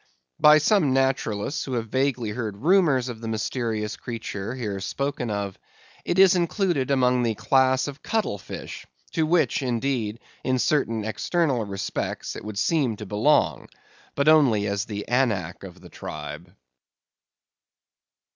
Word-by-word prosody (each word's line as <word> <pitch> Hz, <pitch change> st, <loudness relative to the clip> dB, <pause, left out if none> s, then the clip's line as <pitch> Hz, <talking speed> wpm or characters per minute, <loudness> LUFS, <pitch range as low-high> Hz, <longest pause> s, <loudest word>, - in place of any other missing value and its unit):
By 150 Hz, 0 st, +8 dB
some 155 Hz, -3 st, +3 dB
naturalists 135 Hz, -2 st, 0 dB
who 135 Hz, -, -5 dB
have 115 Hz, -2 st, -2 dB
vaguely 130 Hz, -3 st, 0 dB
heard 110 Hz, -3 st, -4 dB
rumors 155 Hz, -8 st, +4 dB
of 115 Hz, -3 st, -7 dB
the 115 Hz, -, -5 dB
mysterious 110 Hz, -1 st, -2 dB
creature, 115 Hz, -1 st, -5 dB
here 105 Hz, -6 st, -4 dB
spoken 135 Hz, +4 st, -3 dB
of, 100 Hz, -2 st, -3 dB, 0.4 s
it 175 Hz, -, -1 dB
is 190 Hz, -1 st, +7 dB
included 175 Hz, -, 0 dB
among 125 Hz, -2 st, +3 dB
the 115 Hz, -2 st, 0 dB
class 130 Hz, +4 st, +2 dB
of 145 Hz, 0 st, -8 dB
cuttle 215 Hz, -, -1 dB
fish, 95 Hz, -, -8 dB, 0.2 s
to 160 Hz, -1 st, 0 dB
which, 160 Hz, -7 st, +2 dB
indeed, 120 Hz, -3 st, -1 dB, 0.2 s
in 130 Hz, -1 st, +1 dB
certain 115 Hz, -4 st, +1 dB
external 135 Hz, +2 st, 0 dB
respects 100 Hz, 0 st, -4 dB
it -, -, -8 dB
would 105 Hz, -1 st, -6 dB
seem 135 Hz, -4 st, +1 dB
to 105 Hz, -, -8 dB
belong, 110 Hz, +10 st, +2 dB, 0.5 s
but 140 Hz, +1 st, 0 dB
only 135 Hz, -10 st, +5 dB
as 100 Hz, 0 st, -1 dB
the 105 Hz, -2 st, -6 dB
Anak 120 Hz, -7 st, 0 dB
of -, -, -10 dB
the -, -, -14 dB
tribe. 75 Hz, +3 st, -8 dB
125 Hz, 145 wpm, -25 LUFS, 105-140 Hz, 0.5 s, By